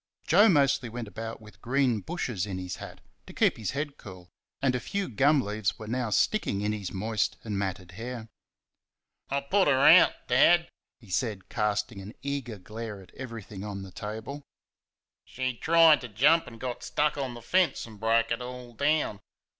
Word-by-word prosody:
Joe 205 Hz, +7 st, +6 dB
mostly 140 Hz, -7 st, +3 dB
went 120 Hz, 0 st, -6 dB
about 115 Hz, +2 st, -6 dB
with 105 Hz, 0 st, -15 dB
green 125 Hz, -2 st, +1 dB
bushes 120 Hz, -, -3 dB
in 95 Hz, -2 st, -4 dB
his 90 Hz, -1 st, -5 dB
hat, -, -, -10 dB, 0.3 s
to -, -, -10 dB
keep -, -, +3 dB
his 110 Hz, -4 st, -3 dB
head 145 Hz, 0 st, -3 dB
cool, 90 Hz, -4 st, -12 dB, 0.3 s
and 135 Hz, -2 st, +2 dB
a 125 Hz, -, 0 dB
few 200 Hz, -, -3 dB
gum 140 Hz, +5 st, +3 dB
leaves 105 Hz, -1 st, -2 dB
were 110 Hz, -, -8 dB
now 120 Hz, +1 st, -2 dB
sticking 105 Hz, -, +1 dB
in 105 Hz, +1 st, 0 dB
his 100 Hz, -3 st, -5 dB
moist 105 Hz, +2 st, -1 dB
and 105 Hz, -3 st, -4 dB
matted 95 Hz, -2 st, -4 dB
hair. 115 Hz, +3 st, -6 dB, 1.0 s
"I 140 Hz, +1 st, 0 dB
put 190 Hz, +8 st, +2 dB
her 135 Hz, -2 st, +4 dB
out, 160 Hz, +6 st, +8 dB
Dad!" 170 Hz, +7 st, +5 dB, 0.3 s
he 110 Hz, -6 st, -15 dB
said, 105 Hz, -2 st, -2 dB
casting 105 Hz, -1 st, -1 dB
an 105 Hz, +4 st, -10 dB
eager 135 Hz, -6 st, -3 dB
glare 105 Hz, +2 st, -7 dB
at 95 Hz, -, -16 dB
everything 115 Hz, -6 st, -8 dB
on 100 Hz, -2 st, -5 dB
the 95 Hz, -, -10 dB
table. 110 Hz, +9 st, -6 dB, 0.8 s
"She 130 Hz, 0 st, -3 dB
tried 165 Hz, +3 st, +5 dB
to 125 Hz, -, -6 dB
jump 145 Hz, +10 st, +3 dB
and 115 Hz, -2 st, -11 dB
got 125 Hz, -1 st, -4 dB
stuck 150 Hz, 0 st, 0 dB
on 135 Hz, -4 st, -3 dB
the 120 Hz, -, -9 dB
fence, 180 Hz, +3 st, +2 dB
and 110 Hz, -3 st, -13 dB
broke 115 Hz, +1 st, +2 dB
it 115 Hz, -, -1 dB
all 125 Hz, -1 st, -8 dB
down. 145 Hz, -5 st, +1 dB
115 Hz, 185 wpm, -28 LUFS, 105-140 Hz, 1.0 s, out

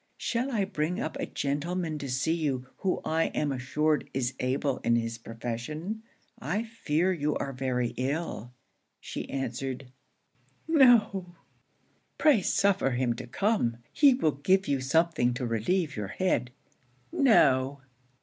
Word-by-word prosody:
'Shall 245 Hz, +3 st, -1 dB
I 210 Hz, -5 st, +1 dB
bring 175 Hz, -2 st, -2 dB
up 155 Hz, -, -3 dB
a -, -, -2 dB
gentleman 155 Hz, +3 st, -2 dB
to 140 Hz, -, -5 dB
see 135 Hz, +6 st, +1 dB
you 140 Hz, -6 st, -1 dB
who 190 Hz, -, -1 dB
I 160 Hz, +1 st, +1 dB
am 150 Hz, -1 st, +1 dB
assured 145 Hz, +4 st, 0 dB
is 130 Hz, -1 st, 0 dB
able 130 Hz, +1 st, 0 dB
in 115 Hz, -, +2 dB
his 115 Hz, 0 st, -2 dB
profession? 125 Hz, -, -5 dB, 0.4 s
I 215 Hz, 0 st, -1 dB
fear 185 Hz, -6 st, 0 dB
you 150 Hz, -3 st, -1 dB
are 135 Hz, -, -3 dB
very 125 Hz, -2 st, -1 dB
ill.' 130 Hz, -3 st, -3 dB, 0.5 s
She -, -, -6 dB
answered, 130 Hz, 0 st, -4 dB, 0.8 s
'no!' 220 Hz, -, +4 dB, 0.8 s
'Pray 295 Hz, -10 st, +5 dB
suffer 195 Hz, -4 st, +2 dB
him 120 Hz, -1 st, 0 dB
to 120 Hz, -, -8 dB
come; 125 Hz, -, 0 dB, 0.2 s
he 280 Hz, -4 st, +6 dB
will 160 Hz, -, +2 dB
give 185 Hz, +8 st, +1 dB
you 140 Hz, -2 st, 0 dB
something 145 Hz, -3 st, +2 dB
to 125 Hz, -1 st, -3 dB
relieve 140 Hz, -, 0 dB
your 105 Hz, -2 st, -3 dB
head.' 125 Hz, -, 0 dB, 0.6 s
'No!' 140 Hz, -, +4 dB
150 Hz, 140 wpm, -28 LUFS, 130-185 Hz, 0.8 s, he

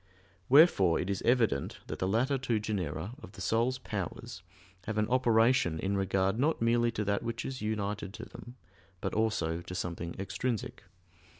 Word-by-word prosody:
Wherefore 130 Hz, -, +6 dB
it 90 Hz, -, -1 dB
is 100 Hz, -, -2 dB
evident 115 Hz, -, +1 dB
that -, -, -6 dB
the 95 Hz, -, 0 dB
latter 130 Hz, +7 st, +1 dB
two 120 Hz, -4 st, 0 dB
genera 100 Hz, -1 st, -3 dB
of 95 Hz, -, -11 dB
the 105 Hz, -, -12 dB
soul's 115 Hz, +7 st, +1 dB
powers 110 Hz, 0 st, -5 dB, 0.4 s
have 110 Hz, 0 st, -3 dB
an 105 Hz, 0 st, +2 dB
operation 115 Hz, -7 st, +3 dB
in 95 Hz, +5 st, -1 dB
regard 95 Hz, +2 st, +1 dB
not 155 Hz, +5 st, +2 dB
merely 120 Hz, +1 st, +3 dB
to 105 Hz, -, -1 dB
that 100 Hz, 0 st, 0 dB
which 115 Hz, 0 st, -4 dB
is 130 Hz, -1 st, -5 dB
united 105 Hz, -2 st, -2 dB
to -, -, -7 dB
them, 120 Hz, +1 st, -11 dB, 0.4 s
but -, -, -3 dB
also 105 Hz, -7 st, 0 dB
to 90 Hz, -, -8 dB
something 85 Hz, -1 st, -4 dB
extrinsic. 110 Hz, +4 st, -3 dB
110 Hz, 170 wpm, -31 LUFS, 95-120 Hz, 0.4 s, Wherefore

